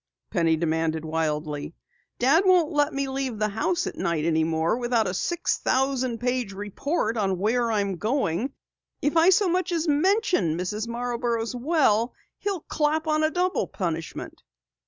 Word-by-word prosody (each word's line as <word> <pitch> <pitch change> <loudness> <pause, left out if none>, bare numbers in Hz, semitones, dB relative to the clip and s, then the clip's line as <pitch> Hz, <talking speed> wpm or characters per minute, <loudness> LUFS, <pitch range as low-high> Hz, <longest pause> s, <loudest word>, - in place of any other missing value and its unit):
Penny 165 -4 +2
demanded 160 -1 -1
wildly. 155 -1 -2 0.4
"Dad 275 +8 +4
won't 365 -5 +4
let 290 0 +2
me 275 0 -2
leave 265 -3 -3
the 215 0 0
house 340 - 0
at - - -5
night 160 -2 -1
any 160 -1 +2
more 160 +3 +1
without 240 -2 +1
a 180 - -2
six 345 - -1
thousand 260 -2 0
page 245 -3 -1
report 215 - -2
on 195 -3 0
where 230 +4 +1
I 210 -2 +2
am 195 -2 -2
going. 225 - -1 0.5
If 295 - +1
I 330 +2 +6
so 380 +1 +4
much 365 +1 0
as 335 -1 0
mention 310 - +2
Mrs. 210 +5 -3
Marborough's 235 -1 -2
well, 245 -4 +2 0.2
he'll 395 -5 -2
clap 310 +1 0
on 310 0 +1
a 310 - +3
double 360 +2 0
punishment." 165 -4 -5
240 Hz, 160 wpm, -25 LUFS, 180-305 Hz, 0.5 s, I